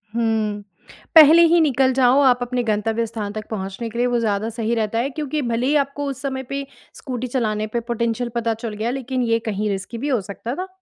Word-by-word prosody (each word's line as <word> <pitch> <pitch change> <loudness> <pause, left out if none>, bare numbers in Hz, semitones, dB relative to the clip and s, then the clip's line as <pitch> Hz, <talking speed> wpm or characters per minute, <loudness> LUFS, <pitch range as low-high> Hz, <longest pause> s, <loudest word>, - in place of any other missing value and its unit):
हुँ, 220 -3 0 0.5
पहले 320 +1 +9
ही 340 +1 +4
निकल 265 -3 +2
जाओ 260 +1 +4
आप 250 -2 +4
अपने 245 0 -1
गंतव्य 220 +1 0
स्थान 210 -2 -5
तक 215 -1 -6
पहुँचने 195 +2 -5
के 235 - -8
लिए, 245 +1 +2
वो 240 -1 +1
ज़्यादा 215 0 -1
सही 230 0 -2
रहता 225 0 -1
है। 265 +4 0
क्योंकि 300 +1 -3
भले 240 0 -1
ही 295 - +2
आपको 285 +1 -6
उस 265 -1 -6
समय 265 -1 -3
पे 275 0 -3 0.3
स्कूटी 255 -2 -5
चलाने 215 -4 -1
पे 235 +2 -2
पोटेंशियल 235 0 -2
पता 230 -1 0
चल 225 -1 -6
गया, 215 +3 -2
लेकिन 260 -1 -3
ये 230 - +3
कहीं 210 +1 -1
रिस्की 195 +4 -4
भी 280 +5 -3
हो 245 -6 +1
सकता 220 +6 -6
था। 370 +2 -4
235 Hz, 220 wpm, -21 LUFS, 220-265 Hz, 0.5 s, पहले